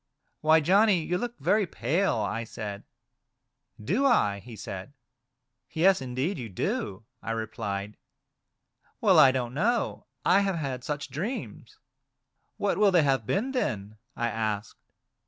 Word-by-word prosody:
" - - -48
Why, 155 +1 +5
Johnny, 190 +2 +4
you 180 +3 -1
look 240 0 -4
very 210 -2 +2
pale," 165 - 0
I 110 +2 -2
said. 105 -2 -7 0.5
" - - -22
Do 240 +8 +2
I 105 - +3
?" - - -17
he 120 -2 -10
said. 100 +4 -7 0.8
"Yes! 180 0 +3
indeed 130 +8 -2
you 115 -3 -6
do," 95 +2 -3 0.2
I - - -7
replied. 105 -2 -4 1.0
"Well, - - +5
I 130 - +8
don't 125 -2 -2
know, 225 - 0 0.2
I 195 - +5
have 195 -2 0
had 135 -6 -4
such 145 0 -4
dreams." 210 - -5 0.4
" - - -50
What 205 -1 0
will 210 -1 +6
they 175 -4 +4
have 135 -6 +1
been, 240 +7 0
then 110 - -2
?" - - -47
I 120 - -1
asked. 110 -2 -4
135 Hz, 155 wpm, -27 LUFS, -, 1.0 s, I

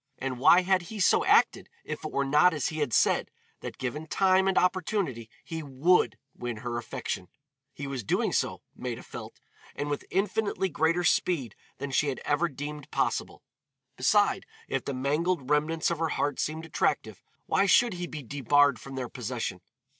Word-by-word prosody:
And 130 -2 -4
why 175 +7 +7
had 185 0 +2
he 205 +5 -8
so 185 - +4
acted - - +3 0.2
if - - -5
it - - -4
were 140 - 0
not 150 +5 +4
as 145 - -1
he 155 - -5
had 145 -5 0
said, - - +3 0.3
that - - -7
given 150 +5 -4
time 190 +2 +3
and 190 - +1
opportunity 180 - 0
he 165 -1 -5
would 140 -3 +2 0.2
win 120 -2 -5
her 120 -1 -2
affection. 90 -5 -5 0.5
He 140 - -6
was 135 -4 -4
doing - - 0
so, - - -1
Maida - - -5
felt, - - -9 0.4
and 145 0 -3
with 145 - -4
infinitely 195 0 0
greater 165 +2 +1
speed 155 - +1 0.2
than 140 0 -5
she 145 +3 +2
had 135 - -2
ever 160 +4 +1
deemed 145 +1 -7
possible. - - -2 0.5
Beside, 195 +8 +2 0.2
if 135 - -2
the 140 - -3
mangled 145 +2 0
remnants 155 +2 +1
of 170 - -2
her 165 -1 0
heart 145 -1 -1
seemed 160 +1 -2
attractive, 165 - -1 0.2
why 200 - +2
should 235 +3 +5
he 175 0 -4
be 155 -3 -7
debarred 145 0 +3
from 135 +3 -9
their 130 -2 -3
possession? 115 -6 -4
150 Hz, 175 wpm, -28 LUFS, 130-175 Hz, 0.5 s, why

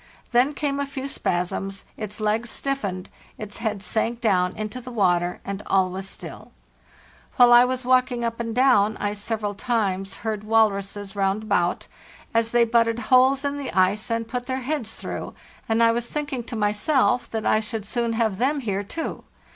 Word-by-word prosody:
Then 255 +4 +3
came 280 -1 -1
a 280 - -1
few 275 0 -5
spasms, 195 -3 -2
its 210 -1 -6
legs 215 +2 0
stiffened, 205 -11 -3 0.3
its 210 -1 -7
head 215 -3 -3
sank 230 +2 -1
down 185 -6 +2
into 215 +4 -5
the 250 - -9
water, 180 -6 +1
and 200 +1 -4
all 190 -1 +2
was 190 +1 -5
still, - - -9 0.8
While 245 -1 +7
I 240 +1 +8
was 255 0 -2
walking 255 -1 +2
up 230 0 -3
and 230 -1 -3
down 220 -5 +4
I 205 0 -1
several 210 0 -3
times 195 -4 -1
heard 215 -2 -2
walruses 205 -2 +1
round 195 +1 0
about, 180 -5 0 0.5
as 230 0 +2
they 240 0 +4
butted 230 0 +2 0.2
holes 265 +2 +5
in 285 0 -1
the 280 - -4
ice 190 +3 +2
and 230 0 -1
put 245 +1 -4
their 260 0 -2
heads 255 -4 -3
through; - - -6 0.3
and 225 +1 +3
I 230 - +6
was 235 +1 -2
thinking 290 -5 -3
to 235 - -6
myself 220 +5 +1
that 220 -1 -3
I 215 - +4
should 220 -1 -5
soon 235 +2 -1
have 220 -4 0
them 280 +4 +1
here 200 -4 -2
too. 325 +11 -5
225 Hz, 180 wpm, -24 LUFS, 205-250 Hz, 0.8 s, I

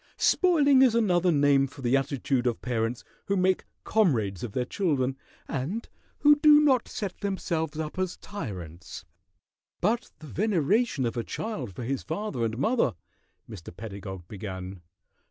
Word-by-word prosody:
Spoiling 290 -7 +4
is 250 -4 +5
another 180 -6 +3
name 140 -2 +4
for 135 0 -12
the 120 +2 +3
attitude 135 -2 0
of 120 - -2
parents 120 -1 -1 0.2
who 200 - 0
make 185 0 +2 0.2
comrades 115 - +1
of 115 -4 -5
their 125 - 0
children 135 -7 0 0.3
and 165 - -3 0.3
who 295 0 +7
do 295 0 +7
not 270 -5 +3
set 200 -4 -5
themselves 165 -6 -2
up 155 +3 -4
as 185 -1 -2
tyrants 90 - -7 0.4
" - - -66 0.3
"But 225 +6 0
the 155 - -12
veneration 195 - +1
of 120 +1 -2
a 115 - -1
child 130 - -5
for - - -5
his 135 +2 -2
father 160 - -3
and 110 0 -1
mother 225 - +1 0.3
" - - -45
Mr. 90 -6 -10
Pedagog 95 -4 -7
began. 95 -2 -7
145 Hz, 155 wpm, -27 LUFS, -, 0.4 s, who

